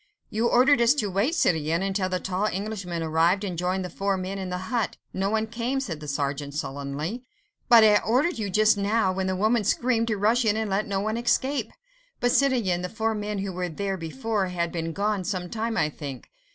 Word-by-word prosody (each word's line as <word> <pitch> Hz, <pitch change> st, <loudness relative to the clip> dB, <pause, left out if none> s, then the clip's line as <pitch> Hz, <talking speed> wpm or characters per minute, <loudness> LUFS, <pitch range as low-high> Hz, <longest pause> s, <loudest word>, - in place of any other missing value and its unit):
"You 225 Hz, +2 st, +1 dB
ordered 255 Hz, +1 st, +5 dB
us 235 Hz, +4 st, +5 dB
to 210 Hz, -8 st, -1 dB
wait, 210 Hz, -, +1 dB
citoyen, 165 Hz, -, +1 dB
until 195 Hz, -1 st, -1 dB
the 185 Hz, 0 st, -1 dB
tall 190 Hz, +3 st, -1 dB
Englishman 190 Hz, -4 st, -3 dB
arrived 165 Hz, +5 st, +2 dB
and 185 Hz, -3 st, -3 dB
joined 180 Hz, +2 st, -1 dB
the -, -, -5 dB
four 195 Hz, +1 st, -1 dB
men 190 Hz, +1 st, -4 dB
in 190 Hz, -1 st, -4 dB
the 180 Hz, -, -2 dB, 0.2 s
hut. 235 Hz, -3 st, 0 dB, 0.2 s
No 195 Hz, +1 st, 0 dB
one 220 Hz, +1 st, +1 dB
came," 235 Hz, +4 st, -2 dB
said 180 Hz, -, -4 dB
the 150 Hz, -, -9 dB
sergeant 140 Hz, 0 st, -3 dB
sullenly. 145 Hz, -, -4 dB, 0.5 s
"But 235 Hz, -2 st, +8 dB
I 210 Hz, -1 st, +6 dB
ordered 260 Hz, +8 st, +1 dB
you 205 Hz, -2 st, -2 dB
just 215 Hz, +2 st, +3 dB
now, 200 Hz, -1 st, +1 dB
when 190 Hz, 0 st, -2 dB
the 190 Hz, -, 0 dB
woman 215 Hz, +4 st, +2 dB
screamed, 230 Hz, +2 st, +1 dB
to 215 Hz, -2 st, 0 dB
rush 220 Hz, +5 st, +3 dB
in 215 Hz, -1 st, +2 dB
and 220 Hz, -2 st, -2 dB
let 200 Hz, +2 st, 0 dB
no 195 Hz, -1 st, -1 dB
one 220 Hz, +2 st, -1 dB
escape." 245 Hz, 0 st, 0 dB, 0.5 s
"But, 245 Hz, -, +2 dB
citoyen, 240 Hz, -12 st, +2 dB
the 180 Hz, -, -4 dB
four 225 Hz, +1 st, -1 dB
men 210 Hz, -1 st, -3 dB
who 190 Hz, -, -4 dB
were 180 Hz, 0 st, -3 dB
there 195 Hz, +4 st, -3 dB
before 200 Hz, +3 st, -2 dB
had 170 Hz, -2 st, -2 dB
been 165 Hz, -1 st, -3 dB
gone 200 Hz, +1 st, -1 dB
some 180 Hz, -2 st, -3 dB
time, 225 Hz, 0 st, -2 dB
I 150 Hz, -1 st, +1 dB
think 140 Hz, -4 st, -8 dB
200 Hz, 220 wpm, -26 LUFS, 180-225 Hz, 0.5 s, But